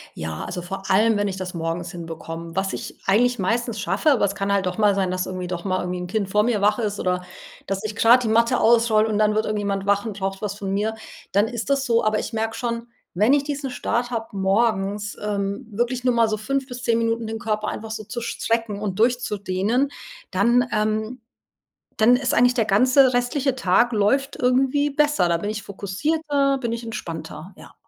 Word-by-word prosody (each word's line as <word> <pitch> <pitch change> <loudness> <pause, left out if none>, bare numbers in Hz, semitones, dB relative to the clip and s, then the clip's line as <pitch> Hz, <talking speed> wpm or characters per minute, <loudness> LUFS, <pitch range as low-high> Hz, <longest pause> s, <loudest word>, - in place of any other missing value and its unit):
Ja, 80 -1 -5
also 180 - -5
vor 195 +2 -5
allem, 215 +2 +4
wenn 205 0 0
ich 190 -1 -4
das 185 -1 -5
morgens 165 +1 -3
hinbekomme. 165 -1 -7
Was 195 0 -1
ich - - -7
eigentlich 245 +4 +3
meistens 225 +3 -1
schaffe, 305 - +1
aber 240 -6 +3
es 200 - -2
kann 200 0 -1
halt 190 -2 +1
doch 180 - -3
mal 210 -2 +4
sein, 190 -2 0
dass 185 0 -1
irgendwie 185 -1 -5
doch 175 -1 -4
mal 185 -1 0
irgendwie 180 0 -3
'n 180 - -4
Kind 200 0 -2
vor 210 +1 +3
mir 220 -4 0
wach 210 +2 +3
ist 210 -3 -2
oder 180 0 -1 0.4
dass 195 +1 -3
ich 215 -1 -4
grad 240 +3 +5
die - - -1
Matte 230 +3 +3
ausrolle 225 -1 +4
und 210 - 0
dann 215 0 +3
wird 215 +1 +1
irgendjemand 200 -2 -2
wach 200 +1 +2
und 210 -3 -5
braucht 195 +1 -3
was 200 -1 -2
von 200 -2 -4
mir, 210 +3 0 0.4
dann 205 +3 +3
ist 240 +2 -4
das 275 -1 +1
so. 235 -2 +2
Aber 215 0 +2
ich - - -5
merke 225 0 -2
schon, 235 -1 -3 0.3
wenn 215 +8 +4
ich 285 -1 +3
diesen 280 -2 -4
Start 245 0 -2
habe 225 -2 -3
morgens, 200 0 0
ähm, 200 +3 -2
wirklich 240 +4 -1
nur 250 -1 +3
mal 230 -1 +3
so 215 0 -1
5 270 +5 -2
bis 250 -1 -8
10 230 -2 +2
Minuten 230 0 0
den 225 0 -4
Körper 215 -1 -2
einfach 220 0 -6
so 220 -1 -5
zu 240 +4 -6
strecken 225 -2 -2
und 205 -2 -4
durchzudehnen, 225 +1 +1 0.4
dann, 245 +1 +3
ähm 215 +3 -1 0.8
dann 240 +3 +6
ist 255 -1 0
eigentlich 245 +1 +4
der 230 - +2
ganze 255 +6 +4
restliche 255 +2 0
Tag 235 +4 +3
läuft 235 +6 +1
irgendwie 265 +3 +2
besser. 295 -8 +2
Da 170 - +2
bin 205 +5 -3
ich 215 -1 -4
fokussierter, 275 +9 -1
bin 235 -3 -2
ich 235 0 -3
entspannter, 165 -5 -7
ja. - - -14
215 Hz, 215 wpm, -23 LUFS, 195-245 Hz, 0.8 s, dann